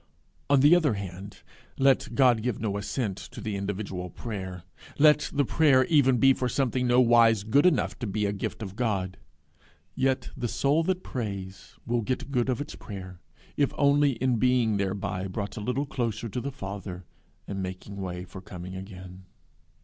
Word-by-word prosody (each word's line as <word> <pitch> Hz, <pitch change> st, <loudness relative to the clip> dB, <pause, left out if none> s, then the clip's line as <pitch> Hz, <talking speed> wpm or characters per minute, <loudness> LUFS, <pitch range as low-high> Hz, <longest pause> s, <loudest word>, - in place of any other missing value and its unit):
On 140 Hz, -2 st, +5 dB
the 150 Hz, +5 st, +7 dB
other 150 Hz, -10 st, +2 dB
hand, 95 Hz, 0 st, -8 dB, 0.3 s
let 135 Hz, -3 st, +2 dB
God 125 Hz, -4 st, +4 dB
give 120 Hz, -1 st, -2 dB
no 105 Hz, -2 st, -2 dB
assent 100 Hz, 0 st, -2 dB
to -, -, -10 dB
the 105 Hz, -2 st, -3 dB
individual 100 Hz, -2 st, -4 dB
prayer, 95 Hz, -5 st, -6 dB, 0.3 s
let 150 Hz, 0 st, +5 dB
the 145 Hz, -1 st, +1 dB
prayer 135 Hz, -2 st, +4 dB
even 135 Hz, -6 st, +4 dB
be 135 Hz, +3 st, +6 dB
for 125 Hz, -1 st, -2 dB
something 125 Hz, 0 st, 0 dB
nowise 115 Hz, -3 st, +5 dB
good 140 Hz, +10 st, +4 dB
enough 155 Hz, -8 st, +1 dB
to 120 Hz, -, -3 dB
be 105 Hz, +1 st, -1 dB
a 100 Hz, -, 0 dB
gift 100 Hz, +2 st, -4 dB
of 95 Hz, -1 st, -7 dB
God, 100 Hz, -6 st, -1 dB, 0.8 s
yet 130 Hz, 0 st, 0 dB
the 120 Hz, -, -2 dB
soul 140 Hz, +7 st, +2 dB
that 185 Hz, 0 st, -1 dB
prays 100 Hz, -6 st, -6 dB
will 120 Hz, 0 st, 0 dB
get 130 Hz, +4 st, -3 dB
good 125 Hz, -1 st, +1 dB
of 125 Hz, -, 0 dB
its 145 Hz, -, -5 dB
prayer, 95 Hz, -3 st, -9 dB, 0.4 s
if 140 Hz, -2 st, +1 dB
only 140 Hz, -1 st, +4 dB
in 125 Hz, 0 st, 0 dB
being 120 Hz, -3 st, +2 dB
thereby 95 Hz, -1 st, -2 dB
brought 100 Hz, +2 st, -4 dB
a 110 Hz, -, -5 dB
little 130 Hz, +6 st, -1 dB
nearer 115 Hz, -2 st, +2 dB, 0.2 s
to 120 Hz, +5 st, -3 dB
the 140 Hz, -, -4 dB
Father, 95 Hz, -7 st, -7 dB, 0.4 s
and 95 Hz, -1 st, -4 dB
making 95 Hz, +2 st, -6 dB
way 90 Hz, -2 st, -5 dB
for 95 Hz, +1 st, -10 dB
coming 90 Hz, 0 st, -8 dB
again. 95 Hz, -1 st, -10 dB
115 Hz, 175 wpm, -27 LUFS, 95-130 Hz, 0.8 s, the